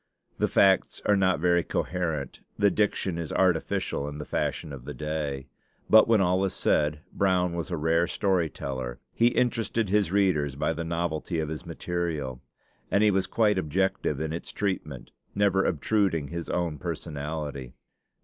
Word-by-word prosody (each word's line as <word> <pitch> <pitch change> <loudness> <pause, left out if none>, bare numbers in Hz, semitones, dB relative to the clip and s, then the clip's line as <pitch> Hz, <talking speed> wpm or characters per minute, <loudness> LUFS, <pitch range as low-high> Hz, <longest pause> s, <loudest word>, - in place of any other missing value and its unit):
The - - +3
facts 95 -1 +3
are 105 - +4
not 95 -5 +2
very 85 +1 +3
coherent, 80 -5 -2 0.2
the 100 -1 +4
diction 95 -4 0
is 80 -3 -4
artificial 85 -5 0
in 75 - -7
the 75 - -6
fashion 75 - -2
of 65 -3 -9
the 75 - -6
day. 75 -3 -3 0.5
But 110 0 +8
when 115 -2 +4
all 90 +1 +2
is 95 - -1
said, 75 0 +1
Brown 90 -2 +2
was 85 +2 -4
a 85 - -2
rare 80 +2 +2
story 95 -5 +1
teller; 65 -4 -5
he 115 - +4
interested 115 -3 0
his 100 -3 +2
readers 90 -9 +2
by 75 - 0
the 85 +1 -4
novelty 85 0 -2
of 80 -1 -2
his 80 +3 -6
material, 80 -7 -3 0.5
and 100 - +3
he 105 - +5
was 95 -1 +1
quite 105 -4 +2
objective 95 +4 0
in 80 0 -2
its 85 - -6
treatment, 75 -11 -3 0.2
never 100 -1 +3
obtruding 85 -3 +1
his 85 -1 -5
own 85 -4 -1
personality. 70 -3 -5
85 Hz, 165 wpm, -27 LUFS, 75-95 Hz, 0.5 s, But